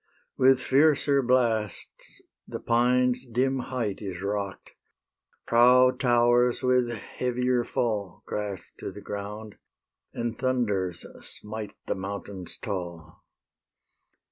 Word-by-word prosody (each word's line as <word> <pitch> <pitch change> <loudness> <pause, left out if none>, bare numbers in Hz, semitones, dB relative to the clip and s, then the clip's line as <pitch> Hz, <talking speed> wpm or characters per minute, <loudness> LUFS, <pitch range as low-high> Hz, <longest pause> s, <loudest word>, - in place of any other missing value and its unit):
With 130 0 +5
fiercer 140 +1 +3
blasts 120 -5 -1 0.2
the - - -5
pine's 125 +1 +2
dim 130 +2 0
height 120 -5 -3
Is 95 -4 -5
rock'd; 100 0 -4 0.7
proud 125 +2 +5
towers 120 0 +3
with 125 -1 +3
heavier 125 +2 -1
fall 105 -7 -2
Crash 100 -3 -5
to - - -5
the - - -10
ground; 105 +1 -7 0.5
and 115 -1 -4
thunders 105 -9 0 0.2
smite 105 -1 -7
The - - 0
mountains 95 -1 -7
tall. 85 -4 -6
120 Hz, 100 wpm, -27 LUFS, 100-125 Hz, 0.7 s, With